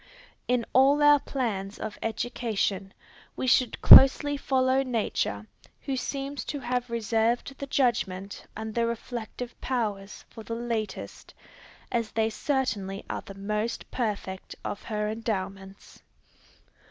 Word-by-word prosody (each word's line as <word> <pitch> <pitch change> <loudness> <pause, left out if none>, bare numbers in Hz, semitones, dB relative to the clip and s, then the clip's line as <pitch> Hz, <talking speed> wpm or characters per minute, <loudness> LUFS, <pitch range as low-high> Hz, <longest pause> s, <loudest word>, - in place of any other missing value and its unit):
In 245 -2 +1
all 275 +3 +5
our 295 0 +7
plans 210 -9 -3
of 215 - -6
education, 220 -4 -2 0.4
we - - -3
should 255 -2 +3
closely 290 +2 +9
follow 265 -1 +2
nature, 225 - -2 0.4
who 270 - -3
seems 275 0 -4
to 290 - -4
have 245 0 -2
reserved 230 +3 0
the 280 - -5
judgment 205 -8 -1
and 220 0 -5
the 235 0 +1
reflective 235 +1 -5
powers 210 -6 -3
for 225 - -11
the 230 - -5
latest, 230 -2 -5 0.6
as 230 -3 0
they 220 0 +1
certainly 215 -8 -2
are - - -3
the 195 - -11
most 210 +3 -3
perfect, 205 -5 -4
of 205 - -4
her 210 -1 -2
endowments. 195 -3 -5
230 Hz, 125 wpm, -27 LUFS, 210-255 Hz, 0.6 s, closely